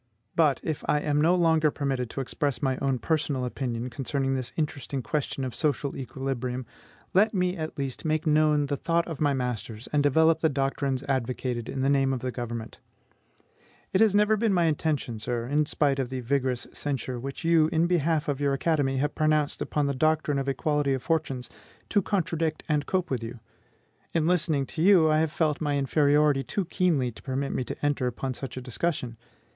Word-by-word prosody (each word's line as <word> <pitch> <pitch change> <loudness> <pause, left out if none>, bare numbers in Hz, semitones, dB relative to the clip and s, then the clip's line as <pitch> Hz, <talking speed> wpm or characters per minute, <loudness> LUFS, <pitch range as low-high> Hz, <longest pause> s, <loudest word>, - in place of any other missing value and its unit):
But, 155 -4 +3
if 155 -3 -3
I 150 - +3
am 150 0 +1
no 170 +4 +4
longer 160 -3 +3
permitted 135 -4 -2
to 135 - -4
express 140 +2 -2
my 130 -1 +2
own 135 -2 0
personal 145 -3 -1
opinion 125 -1 -3
concerning 135 +1 -1
this 130 -2 -3
interesting 140 -4 -2
question 145 -1 -2
of 125 - -4
social 145 -2 -1
equilibrium, 130 -1 -4 0.5
let 210 +3 +4
me, 180 -1 +1
at 155 -2 -5
least, 135 -3 -4
make 155 0 0
known 150 -1 +3
the 140 0 -2
thought 170 +3 0
of 160 -4 -6
my 145 -2 +3
masters, 120 -3 -4
and 145 - +4
develop 160 +3 +4
the 160 - +3
doctrines 135 -1 -1
advocated 125 -3 -2
in 135 - -3
the - - +2
name 135 -1 +3
of 125 - -3
the 130 - -2
government. 120 -2 -6 1.1
It 190 - +3
never 210 +1 +4
has 215 - +1
been 220 -3 +2
my 175 - +3
intention, 150 -7 0
sir, 115 +1 -2
in 145 +3 +1
spite 140 -3 +1
of 130 -2 -1
the 130 -1 -4
vigorous 130 0 0
censure 130 -3 -3
which 135 +6 -6
you, 165 -2 +4
in 160 +1 +2
behalf 165 -2 +1
of 145 -1 -1
your 140 -1 +2
academy, 135 -2 +1
have 145 +2 0
pronounced 155 -1 +1
upon 150 -1 0
the 140 - 0
doctrine 150 +1 +1
of 135 0 -2
equality 145 +1 +1
of 130 - -6
fortunes, 140 -6 -1 0.4
to 205 - +3
contradict 165 -5 -1
and 150 -2 0
cope 185 -4 -1
with 125 -3 -1
you. 115 +1 -7 0.8
In 160 -2 +2
listening 160 -5 +2
to 155 - -5
you, 175 -4 +6
I 155 - +3
have 160 -1 +1
felt 155 -2 0
my 145 -2 0
inferiority 145 0 +3
too 195 +5 -2
keenly 160 -9 +1
to - - -14
permit 135 +1 -2
me - - -1
to - - -5
enter 145 -3 +1
upon 130 +2 -3
such 130 +1 -7
a - - -3
discussion. 125 -1 -2
145 Hz, 195 wpm, -27 LUFS, 130-155 Hz, 1.1 s, you